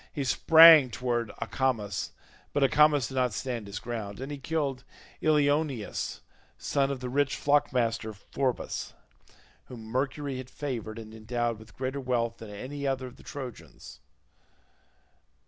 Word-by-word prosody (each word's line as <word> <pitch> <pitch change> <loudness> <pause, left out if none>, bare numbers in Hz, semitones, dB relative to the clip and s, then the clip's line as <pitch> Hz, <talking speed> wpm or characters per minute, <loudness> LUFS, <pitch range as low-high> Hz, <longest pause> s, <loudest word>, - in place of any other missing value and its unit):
He 145 - -3
sprang 160 +1 +8
towards 120 -2 -2
Acamas, 115 -7 -1 0.4
but 145 - +2
Acamas 145 0 +4
did - - -9
not 125 -3 +1
stand 120 -2 -4
his 100 +1 -6
ground, 110 -4 -5
and 135 +2 -5
he 145 - -5
killed 140 -3 -2 0.4
Ilioneus 145 -6 0 0.4
son 140 -1 0
of 135 -2 -4
the 125 - -4
rich 140 +2 +1
flock 145 0 +2
master 115 -3 0
Phorbas, 125 +5 -3 0.7
whom 120 -3 -10
Mercury 135 +3 -2
had 130 -1 -8
favoured 120 -7 -5
and 110 -1 -9
endowed 115 +1 -2
with 110 0 -16
greater 130 +2 -3
wealth 120 -2 -1
than 110 - -10
any 135 +7 -5
other 135 -1 -1
of 125 - -11
the - - -15
Trojans. 130 -4 -9
130 Hz, 145 wpm, -28 LUFS, 115-140 Hz, 0.7 s, sprang